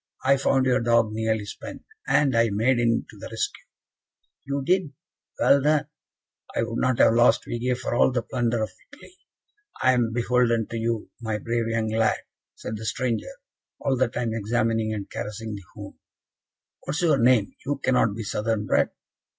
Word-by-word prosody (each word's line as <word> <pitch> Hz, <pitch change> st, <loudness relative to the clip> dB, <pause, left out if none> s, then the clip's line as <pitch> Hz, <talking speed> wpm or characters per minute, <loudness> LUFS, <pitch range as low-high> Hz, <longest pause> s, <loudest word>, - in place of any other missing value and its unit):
"I 135 Hz, +1 st, +5 dB
found 135 Hz, -1 st, +2 dB
your 130 Hz, 0 st, +3 dB
dog 115 Hz, -2 st, +3 dB
nearly 110 Hz, -1 st, -1 dB
spent, 100 Hz, -, -9 dB, 0.2 s
and 140 Hz, -4 st, +3 dB
I 115 Hz, 0 st, +4 dB
made 115 Hz, +5 st, +2 dB
in 115 Hz, -1 st, +1 dB
to -, -, -15 dB
the -, -, -7 dB
rescue." -, -, -4 dB, 0.8 s
"You 140 Hz, 0 st, -2 dB
did? 180 Hz, -2 st, +1 dB, 0.5 s
Well 140 Hz, -, +5 dB
done! 150 Hz, +1 st, +2 dB, 0.7 s
I -, -, +1 dB
would 115 Hz, 0 st, -3 dB
not 130 Hz, -2 st, +1 dB
have 115 Hz, -, +5 dB
lost 120 Hz, 0 st, +4 dB
Vige 125 Hz, +1 st, -1 dB
for 130 Hz, -, -3 dB
all 120 Hz, -, +4 dB
the 120 Hz, -2 st, -1 dB
plunder 120 Hz, -2 st, -1 dB
of 110 Hz, -, -4 dB, 0.2 s
Italy. 310 Hz, +5 st, -15 dB, 0.6 s
I 130 Hz, -, +4 dB
am 120 Hz, -2 st, +1 dB
beholden 120 Hz, -1 st, +2 dB
to 115 Hz, -, -3 dB
you, 115 Hz, -1 st, -2 dB
my 110 Hz, -2 st, -2 dB
brave 115 Hz, +2 st, -2 dB
young 115 Hz, -1 st, -1 dB
lad," 110 Hz, 0 st, +2 dB, 0.4 s
said 110 Hz, -, -6 dB
the 110 Hz, -, -8 dB
stranger, 120 Hz, +1 st, -1 dB, 0.5 s
all 135 Hz, -2 st, 0 dB
the 130 Hz, 0 st, +2 dB
time 115 Hz, -1 st, -3 dB
examining 110 Hz, 0 st, 0 dB
and 105 Hz, -2 st, -4 dB
caressing 110 Hz, +1 st, -6 dB
the 100 Hz, -, -7 dB
hound. -, -, -9 dB, 0.9 s
"What -, -, -5 dB
is 150 Hz, -, -1 dB
your 155 Hz, -5 st, +3 dB
name? 120 Hz, -3 st, +3 dB
You 145 Hz, 0 st, -2 dB
cannot 125 Hz, -6 st, +2 dB
be 115 Hz, -, -5 dB
Southern 105 Hz, +1 st, -1 dB
bred?" -, -, +2 dB
115 Hz, 180 wpm, -25 LUFS, 110-130 Hz, 0.9 s, I